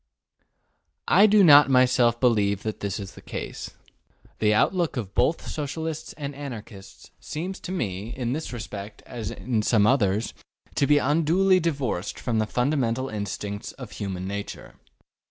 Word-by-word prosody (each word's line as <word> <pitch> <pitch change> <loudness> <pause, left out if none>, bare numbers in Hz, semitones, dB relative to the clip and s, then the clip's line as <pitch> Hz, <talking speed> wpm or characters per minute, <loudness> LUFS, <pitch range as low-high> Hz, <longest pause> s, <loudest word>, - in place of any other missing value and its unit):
I 200 +4 +6
do 210 -1 +6
not 145 -4 +8
myself 125 -2 +4
believe 105 -5 +2
that 110 -1 -4
this 100 0 -3
is 100 -2 -7
the - - -13
case. - - -6 0.7
The 105 -1 +3
outlook 165 - +1
of 100 -5 -4
both 140 +7 +1
Socialists 160 +2 -4
and 145 -2 -6
Anarchists 115 -8 -9
seems 180 +5 -5
to 180 - -7
me, 105 - -3
in 125 -1 -1
this 155 +2 -4
respect 105 -3 -7
as 115 -4 -5
in 120 -3 -2
some 105 -1 +3
others, 110 -4 +2 0.4
to 140 - +1
be 150 - +5
unduly 165 +6 +3
divorced 135 - -2
from 115 -3 -1
the 110 - 0
fundamental 130 0 0
instincts 100 0 -5
of 125 -5 -10
human 95 -3 -5
nature. 100 +1 -6
125 Hz, 150 wpm, -25 LUFS, 105-150 Hz, 0.7 s, not